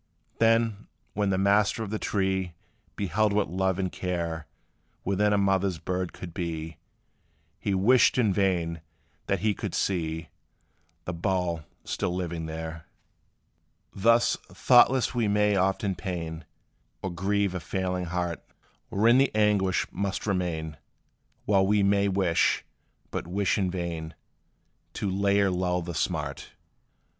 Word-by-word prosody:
Then, 115 Hz, -2 st, +2 dB, 0.3 s
when 105 Hz, -1 st, 0 dB
the 95 Hz, -, +1 dB
master 100 Hz, +3 st, +2 dB
of 105 Hz, -, -6 dB
the 110 Hz, -, -2 dB
tree 95 Hz, -3 st, -1 dB, 0.4 s
Beheld 105 Hz, +2 st, +1 dB
what 105 Hz, -4 st, +1 dB
love 95 Hz, 0 st, 0 dB
and 95 Hz, -2 st, -1 dB
care 85 Hz, -3 st, -3 dB, 0.6 s
Within 100 Hz, +2 st, +2 dB
a 105 Hz, -, +3 dB
mother 95 Hz, -1 st, +2 dB
bird 90 Hz, -1 st, -2 dB
could 85 Hz, -3 st, -9 dB
be, 80 Hz, -3 st, -4 dB, 0.8 s
He 100 Hz, -, -1 dB
wished 120 Hz, +9 st, +4 dB
in 110 Hz, -6 st, +3 dB
vain 85 Hz, -4 st, 0 dB, 0.5 s
that -, -, 0 dB
he 105 Hz, 0 st, +2 dB
could -, -, -5 dB
see 80 Hz, -3 st, -1 dB, 0.8 s
The 90 Hz, -, -3 dB
bough 85 Hz, -3 st, -1 dB, 0.2 s
still 90 Hz, -, -2 dB
living 85 Hz, -3 st, -3 dB
there. 80 Hz, 0 st, -6 dB, 1.1 s
Thus, 115 Hz, +4 st, +4 dB, 0.2 s
thoughtless 130 Hz, 0 st, +4 dB
we 120 Hz, -3 st, +1 dB
may 105 Hz, 0 st, +3 dB
often 95 Hz, +1 st, +1 dB
pain 85 Hz, -3 st, -5 dB, 0.6 s
Or 95 Hz, -, -2 dB
grieve 100 Hz, +2 st, 0 dB
a 90 Hz, -, -2 dB
feeling 90 Hz, +2 st, -2 dB
heart, 85 Hz, 0 st, -3 dB, 0.5 s
Wherein 115 Hz, +5 st, +4 dB
the 135 Hz, -, +4 dB
anguish 105 Hz, -3 st, +2 dB
must 100 Hz, -1 st, -3 dB
remain, 85 Hz, -6 st, -2 dB, 0.7 s
While 95 Hz, -2 st, +3 dB
we 105 Hz, 0 st, +3 dB
may 100 Hz, 0 st, +3 dB
wish, 95 Hz, -4 st, +2 dB, 0.5 s
but -, -, -4 dB
wish 95 Hz, +2 st, +1 dB
in 95 Hz, -4 st, 0 dB
vain, 85 Hz, -3 st, -4 dB, 0.8 s
To 100 Hz, -, -2 dB
lay 100 Hz, +1 st, +2 dB
or 100 Hz, -1 st, +2 dB
lull 90 Hz, -1 st, 0 dB
the 85 Hz, 0 st, -5 dB
smart. 75 Hz, -3 st, -3 dB
95 Hz, 135 wpm, -27 LUFS, 85-100 Hz, 1.1 s, wished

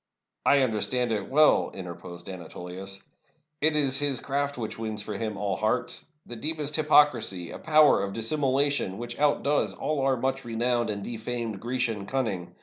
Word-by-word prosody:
" -, -, -57 dB
"I 140 Hz, -, +4 dB
understand 125 Hz, +1 st, +1 dB
it 105 Hz, -3 st, -2 dB
well," 150 Hz, +3 st, +4 dB
interposed 85 Hz, -1 st, -8 dB
Anatolius. 95 Hz, +1 st, -7 dB, 0.6 s
"It 155 Hz, +1 st, +3 dB
is 140 Hz, -2 st, +3 dB
his 140 Hz, -4 st, +1 dB
craft 140 Hz, +2 st, -2 dB
which 110 Hz, -2 st, -5 dB
wins 110 Hz, -2 st, -3 dB
for -, -, -5 dB
him 110 Hz, -2 st, -3 dB
all 100 Hz, -1 st, -1 dB
hearts 120 Hz, -, -1 dB
— -, -, -52 dB
the 120 Hz, -, -8 dB
deepest 150 Hz, +3 st, -3 dB
hypocrisy, 145 Hz, -, +4 dB
a -, -, -8 dB
power 155 Hz, -7 st, +5 dB
of 100 Hz, 0 st, -3 dB
dissimulation 135 Hz, -2 st, 0 dB
which 120 Hz, +1 st, -6 dB
outdoes 145 Hz, 0 st, +1 dB
all 150 Hz, -2 st, -2 dB
our 135 Hz, -1 st, +2 dB
much 135 Hz, +2 st, -2 dB
renowned 120 Hz, 0 st, 0 dB
and 100 Hz, -1 st, -3 dB
defamed 115 Hz, -2 st, -4 dB
Grecian 115 Hz, -3 st, -2 dB
cunning. 110 Hz, -10 st, -3 dB
120 Hz, 165 wpm, -27 LUFS, 105-140 Hz, 0.6 s, power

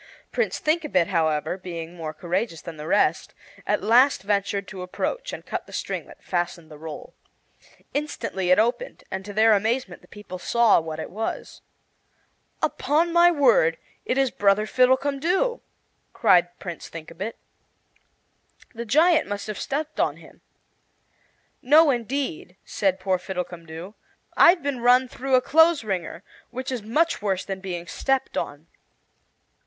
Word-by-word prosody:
Prince 480 Hz, -, 0 dB
Thinkabit, 300 Hz, -, +1 dB
however, 160 Hz, -1 st, 0 dB
being 170 Hz, -2 st, -7 dB
more 165 Hz, -3 st, -5 dB
courageous 170 Hz, +3 st, -3 dB
than 165 Hz, -2 st, -9 dB
the 150 Hz, +1 st, -7 dB
rest, 380 Hz, -, +1 dB, 0.3 s
at -, -, 0 dB
last 245 Hz, +1 st, +4 dB
ventured 200 Hz, -1 st, -1 dB
to 190 Hz, -3 st, -8 dB
approach -, -, -3 dB
and -, -, -8 dB
cut -, -, -5 dB
the -, -, -14 dB
string -, -, -4 dB
that -, -, -16 dB
fastened 175 Hz, -2 st, -3 dB
the 150 Hz, -, -10 dB
roll. 160 Hz, -1 st, -8 dB, 0.8 s
Instantly 270 Hz, -10 st, -3 dB
it 185 Hz, -, +6 dB
opened, 240 Hz, -, 0 dB
and 190 Hz, 0 st, -4 dB
to 205 Hz, -, -8 dB
their 220 Hz, +2 st, +5 dB
amazement 225 Hz, +5 st, -1 dB
the -, -, -20 dB
people 205 Hz, -3 st, -9 dB
saw 235 Hz, +2 st, +4 dB
what 160 Hz, -1 st, -6 dB
it -, -, -6 dB
was. 220 Hz, +4 st, -5 dB, 1.0 s
"Upon 330 Hz, +4 st, +1 dB
my 345 Hz, 0 st, +7 dB
word, 245 Hz, -, +3 dB, 0.3 s
it 255 Hz, -, -1 dB
is 270 Hz, -2 st, +2 dB
brother 205 Hz, +1 st, +2 dB
Fiddlecumdoo!" 285 Hz, -, +2 dB, 0.5 s
cried 175 Hz, 0 st, +3 dB
Prince 175 Hz, -3 st, -7 dB
Thinkabit. 165 Hz, +6 st, -7 dB, 1.4 s
"The 235 Hz, 0 st, -6 dB
giant 315 Hz, +8 st, +4 dB
must 205 Hz, 0 st, -4 dB
have 215 Hz, -1 st, -5 dB
stepped 300 Hz, +2 st, -3 dB
on -, -, +1 dB
him." -, -, -17 dB, 1.2 s
"No, 300 Hz, +3 st, +6 dB
indeed," 240 Hz, -, -3 dB
said 190 Hz, -2 st, 0 dB
poor 185 Hz, -1 st, 0 dB
Fiddlecumdoo, 175 Hz, -1 st, -6 dB, 0.4 s
"I've 345 Hz, -2 st, +6 dB
been 280 Hz, -3 st, -2 dB
run 250 Hz, +2 st, +5 dB
through 265 Hz, +1 st, -1 dB
a 255 Hz, -, +5 dB
clothes 320 Hz, +1 st, +4 dB
wringer, 185 Hz, -3 st, -4 dB, 0.3 s
which 255 Hz, +2 st, -5 dB
is 250 Hz, -3 st, -3 dB
much 300 Hz, +10 st, 0 dB
worse 195 Hz, -3 st, -1 dB
than 195 Hz, -1 st, -4 dB
being 180 Hz, -3 st, -5 dB
stepped 270 Hz, +8 st, -1 dB
on." 145 Hz, +2 st, -4 dB
210 Hz, 145 wpm, -24 LUFS, 180-270 Hz, 1.4 s, my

